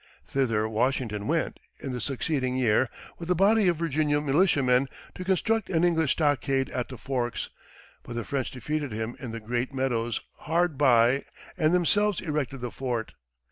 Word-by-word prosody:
Thither 115 Hz, -6 st, +1 dB
Washington 110 Hz, -2 st, -1 dB
went, 165 Hz, 0 st, 0 dB, 0.2 s
in 135 Hz, -, -5 dB
the 125 Hz, -1 st, -4 dB
succeeding 130 Hz, 0 st, -1 dB
year, 120 Hz, 0 st, +3 dB, 0.3 s
with 170 Hz, 0 st, -7 dB
a 180 Hz, -, +3 dB
body 205 Hz, +3 st, +4 dB
of 175 Hz, -2 st, +2 dB
Virginia 150 Hz, -2 st, +1 dB
militiamen, 140 Hz, -4 st, +3 dB, 0.3 s
to 185 Hz, -, -6 dB
construct 195 Hz, +4 st, +1 dB
an 170 Hz, -2 st, +2 dB
English 160 Hz, -4 st, +3 dB
stockade 135 Hz, -3 st, +1 dB
at 125 Hz, -, -2 dB
the 130 Hz, -, -9 dB
forks; 125 Hz, -2 st, -3 dB, 0.5 s
but 120 Hz, -, -8 dB
the 120 Hz, -, -2 dB
French 135 Hz, +2 st, -2 dB
defeated 145 Hz, +1 st, -3 dB
him 110 Hz, +2 st, -3 dB
in 125 Hz, -, -6 dB
the 115 Hz, +1 st, -5 dB
Great 120 Hz, +4 st, -2 dB
Meadows 120 Hz, -4 st, 0 dB, 0.3 s
hard 170 Hz, -1 st, +2 dB
by 130 Hz, -1 st, +4 dB, 0.3 s
and 160 Hz, -4 st, +2 dB
themselves 200 Hz, +3 st, +2 dB
erected 145 Hz, -6 st, -3 dB
the 120 Hz, -1 st, -4 dB
fort. 120 Hz, -4 st, -3 dB
135 Hz, 165 wpm, -27 LUFS, 120-160 Hz, 0.5 s, body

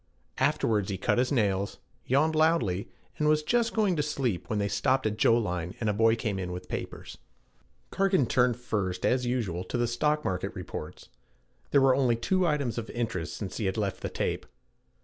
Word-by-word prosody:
Afterwards 105 Hz, -3 st, +1 dB
he 95 Hz, -, -2 dB
cut 95 Hz, -, +1 dB
his 125 Hz, +2 st, +1 dB
nails, 100 Hz, -6 st, 0 dB, 0.3 s
yawned 150 Hz, +5 st, +3 dB
loudly, 155 Hz, -, +2 dB, 0.3 s
and 150 Hz, -, +2 dB
was 155 Hz, 0 st, +3 dB
just 235 Hz, +6 st, +1 dB
going 210 Hz, -5 st, +2 dB
to -, -, +2 dB
sleep 135 Hz, -10 st, -2 dB
when 110 Hz, -, 0 dB
they 100 Hz, 0 st, +1 dB
stopped 130 Hz, +5 st, +1 dB
at 105 Hz, -1 st, 0 dB
Joline 90 Hz, -6 st, +1 dB
and 110 Hz, -, -1 dB
a -, -, -2 dB
boy 115 Hz, +2 st, +4 dB
came 105 Hz, -4 st, -2 dB
in 90 Hz, -1 st, -4 dB
with 90 Hz, 0 st, -7 dB
papers. -, -, -6 dB, 0.7 s
Cargan 195 Hz, -7 st, +2 dB
turned 125 Hz, -1 st, +2 dB
first, 100 Hz, -7 st, -2 dB
as 125 Hz, -1 st, +2 dB
usual, 105 Hz, -8 st, -1 dB
to 105 Hz, -, -3 dB
the 120 Hz, -, +2 dB
stock 150 Hz, +6 st, 0 dB
market 95 Hz, -2 st, -2 dB
reports. -, -, -7 dB, 0.6 s
There 140 Hz, -, +4 dB
were 135 Hz, -1 st, +5 dB
only 130 Hz, -3 st, +3 dB
two 185 Hz, +10 st, +1 dB
items 140 Hz, -7 st, 0 dB
of 115 Hz, -, -7 dB
interest 115 Hz, -8 st, -3 dB
since 100 Hz, -3 st, -5 dB
he 110 Hz, -, -2 dB
had 95 Hz, +3 st, -1 dB
left 100 Hz, -3 st, -2 dB
the -, -, -3 dB
tape. -, -, -2 dB
120 Hz, 190 wpm, -28 LUFS, 100-140 Hz, 0.7 s, were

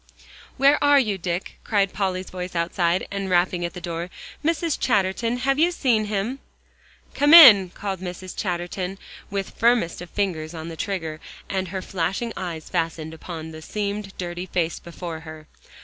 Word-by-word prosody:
"Where 280 Hz, +3 st, +4 dB
are 285 Hz, -1 st, +6 dB
you, 210 Hz, -7 st, 0 dB
Dick?" 175 Hz, +1 st, -4 dB
cried 200 Hz, -3 st, +1 dB
Polly's 190 Hz, -2 st, -2 dB
voice 180 Hz, -1 st, -6 dB
outside, 170 Hz, +1 st, 0 dB
and 195 Hz, -1 st, -3 dB
rapping 175 Hz, 0 st, +2 dB
at 170 Hz, +2 st, -4 dB
the -, -, -5 dB
door. 170 Hz, 0 st, -4 dB, 0.3 s
"Mrs. 330 Hz, 0 st, 0 dB
Chatterton, 230 Hz, +2 st, +1 dB
have 270 Hz, +3 st, +1 dB
you 335 Hz, +2 st, +5 dB
seen 245 Hz, -10 st, +1 dB
him?" 210 Hz, +6 st, -2 dB, 0.7 s
"Come 290 Hz, +3 st, +6 dB
in," 210 Hz, -, +10 dB
called 195 Hz, 0 st, -5 dB
Mrs. 185 Hz, 0 st, -7 dB
Chatterton, 180 Hz, 0 st, -3 dB, 0.3 s
with 195 Hz, -1 st, -3 dB
firmest 230 Hz, -8 st, +2 dB
of 175 Hz, -, -8 dB
fingers 170 Hz, -5 st, -2 dB
on 160 Hz, +1 st, -6 dB
the 165 Hz, -, -7 dB
trigger 160 Hz, -4 st, -3 dB, 0.3 s
and 190 Hz, -1 st, -1 dB
her 190 Hz, +1 st, -5 dB
flashing 195 Hz, +6 st, -2 dB
eyes 170 Hz, -4 st, -5 dB
fastened 165 Hz, -2 st, -2 dB
upon 160 Hz, -1 st, -7 dB
the 160 Hz, 0 st, -9 dB
seamed, 205 Hz, +2 st, -4 dB
dirty 175 Hz, 0 st, -5 dB
face 170 Hz, -2 st, -1 dB
before 170 Hz, -1 st, -7 dB
her. 155 Hz, -1 st, -10 dB
185 Hz, 165 wpm, -24 LUFS, 170-210 Hz, 0.7 s, in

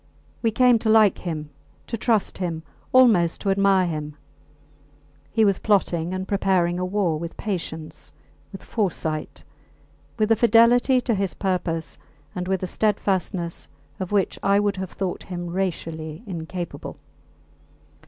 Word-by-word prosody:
We 230 Hz, -, +2 dB
came 245 Hz, +1 st, +4 dB
to 220 Hz, -, -1 dB
like 215 Hz, -3 st, +5 dB
him, 155 Hz, -4 st, -5 dB, 0.3 s
to -, -, -4 dB
trust 225 Hz, -4 st, 0 dB
him, 165 Hz, -3 st, -3 dB, 0.3 s
almost 220 Hz, -10 st, +5 dB
to 200 Hz, -, +1 dB
admire 195 Hz, -1 st, +3 dB
him. 150 Hz, -3 st, -4 dB, 1.1 s
He 220 Hz, +2 st, +3 dB
was 200 Hz, -2 st, +2 dB
plotting 180 Hz, -5 st, +1 dB
and 185 Hz, 0 st, -4 dB
preparing 185 Hz, -3 st, +1 dB
a 180 Hz, -, -1 dB
war 180 Hz, -5 st, 0 dB
with 170 Hz, +1 st, -7 dB
patience, 160 Hz, -6 st, -5 dB, 0.4 s
with 195 Hz, -, -10 dB
foresight 160 Hz, -7 st, -3 dB, 0.7 s
with 215 Hz, 0 st, +1 dB
a -, -, +7 dB
fidelity 240 Hz, +3 st, +5 dB
to 240 Hz, -, 0 dB
his 195 Hz, -2 st, -1 dB
purpose 175 Hz, -4 st, -2 dB, 0.3 s
and 180 Hz, 0 st, -4 dB
with 190 Hz, -1 st, -1 dB
a -, -, -1 dB
steadfastness 190 Hz, -4 st, -1 dB, 0.3 s
of 185 Hz, 0 st, -4 dB
which 200 Hz, -2 st, +1 dB
I 200 Hz, +1 st, +3 dB
would 205 Hz, -1 st, 0 dB
have 190 Hz, -1 st, -4 dB
thought 190 Hz, -1 st, -4 dB
him 175 Hz, -2 st, -6 dB
racially 165 Hz, -4 st, -3 dB
incapable. 175 Hz, -1 st, -6 dB
190 Hz, 140 wpm, -24 LUFS, 170-210 Hz, 1.1 s, a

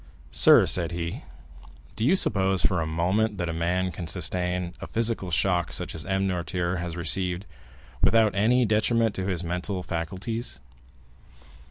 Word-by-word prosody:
"Sir," -, -, +7 dB
said 85 Hz, -2 st, +1 dB
he, 85 Hz, 0 st, -5 dB, 0.7 s
"do 110 Hz, -, -3 dB
you 140 Hz, +10 st, +4 dB
suppose 95 Hz, -, +1 dB
for 90 Hz, -3 st, +1 dB
a 80 Hz, -, -2 dB
moment 95 Hz, +7 st, 0 dB
that 85 Hz, -2 st, -3 dB
a -, -, -3 dB
man 90 Hz, +3 st, -1 dB
can 85 Hz, -2 st, -7 dB
sustain 90 Hz, 0 st, -1 dB
a -, -, -6 dB
physical 115 Hz, -4 st, 0 dB
shock, 90 Hz, -2 st, +1 dB
such -, -, -3 dB
as 75 Hz, -2 st, -5 dB
M. 95 Hz, 0 st, 0 dB
Noirtier 90 Hz, 0 st, -2 dB
has 85 Hz, -1 st, -5 dB
received, 90 Hz, +3 st, +1 dB, 0.6 s
without 110 Hz, -2 st, +4 dB
any 120 Hz, +5 st, +2 dB
detriment 110 Hz, +1 st, +1 dB
to 95 Hz, 0 st, -4 dB
his 90 Hz, -2 st, -1 dB
mental 90 Hz, +2 st, -3 dB
faculties?" 95 Hz, -, -3 dB
90 Hz, 155 wpm, -25 LUFS, 85-100 Hz, 0.7 s, Sir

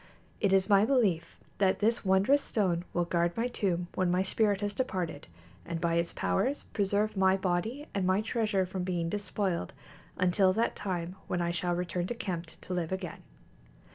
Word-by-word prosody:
It 200 Hz, -, +2 dB
is 190 Hz, -1 st, +4 dB
my 200 Hz, -1 st, +5 dB
belief 215 Hz, -10 st, +1 dB, 0.2 s
that 190 Hz, -2 st, +3 dB
this 225 Hz, +3 st, +1 dB
wondrous 195 Hz, +9 st, +4 dB
stone 180 Hz, -8 st, 0 dB
will 175 Hz, 0 st, 0 dB
guard 170 Hz, +1 st, 0 dB
my 235 Hz, +2 st, +1 dB
tomb 180 Hz, -7 st, -1 dB
when 185 Hz, -1 st, +1 dB
my 180 Hz, +1 st, +2 dB
spirit 205 Hz, +1 st, +1 dB
has 205 Hz, 0 st, -1 dB
departed, 185 Hz, -, -3 dB, 0.4 s
and 170 Hz, -1 st, -4 dB
by 170 Hz, 0 st, 0 dB
its 170 Hz, 0 st, +1 dB
powers 95 Hz, -, 0 dB
preserve 205 Hz, +1 st, +1 dB
my 190 Hz, 0 st, +4 dB
body 195 Hz, +10 st, -1 dB
and 195 Hz, -2 st, 0 dB
my 190 Hz, +2 st, +3 dB
treasure 215 Hz, -4 st, 0 dB
from 185 Hz, +1 st, -4 dB
being 175 Hz, -2 st, -1 dB
despoiled, 190 Hz, -, -2 dB, 0.4 s
until 185 Hz, +1 st, +3 dB
that 230 Hz, +4 st, 0 dB
time 180 Hz, -2 st, -3 dB
when 180 Hz, -, -1 dB
I 170 Hz, 0 st, 0 dB
shall 175 Hz, 0 st, -1 dB
return 175 Hz, 0 st, -2 dB
to 240 Hz, -, -3 dB
Qemt[B] 175 Hz, -7 st, -5 dB
to 185 Hz, -, -5 dB
live 175 Hz, -2 st, -2 dB
again. 190 Hz, -2 st, -4 dB
190 Hz, 180 wpm, -30 LUFS, 175-205 Hz, 0.4 s, my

